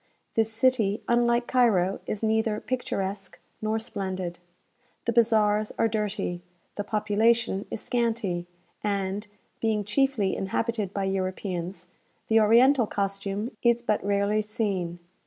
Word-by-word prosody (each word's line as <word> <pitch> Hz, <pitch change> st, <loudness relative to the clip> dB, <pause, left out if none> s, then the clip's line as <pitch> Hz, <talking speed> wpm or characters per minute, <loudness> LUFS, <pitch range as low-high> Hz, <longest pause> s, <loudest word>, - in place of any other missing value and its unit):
This 225 Hz, 0 st, +2 dB
city, 220 Hz, -3 st, +2 dB
unlike 235 Hz, 0 st, +3 dB
Cairo, 205 Hz, -8 st, +3 dB
is 215 Hz, -, -3 dB
neither 220 Hz, -1 st, +1 dB
picturesque 195 Hz, -6 st, -3 dB, 0.2 s
nor 215 Hz, 0 st, 0 dB
splendid. 190 Hz, -5 st, -4 dB, 0.7 s
The 235 Hz, -, +1 dB
bazaars 215 Hz, -2 st, +3 dB
are 225 Hz, -, +3 dB
dirty, 210 Hz, -5 st, -2 dB, 0.3 s
the 205 Hz, -, -3 dB
population 215 Hz, 0 st, +1 dB
is -, -, -5 dB
scanty, 225 Hz, -8 st, -1 dB, 0.4 s
and 200 Hz, 0 st, -1 dB, 0.3 s
(being 220 Hz, -2 st, +1 dB
chiefly 225 Hz, -3 st, +1 dB
inhabited 210 Hz, +1 st, -1 dB
by 200 Hz, -1 st, -2 dB
Europeans) 185 Hz, -2 st, -3 dB, 0.4 s
the 225 Hz, 0 st, +5 dB
oriental 235 Hz, +3 st, +5 dB
costume 200 Hz, +2 st, -2 dB
is 235 Hz, 0 st, +3 dB
but 215 Hz, -3 st, 0 dB
rarely 200 Hz, +1 st, +1 dB
seen. 200 Hz, -5 st, -2 dB
210 Hz, 120 wpm, -27 LUFS, 195-230 Hz, 0.7 s, the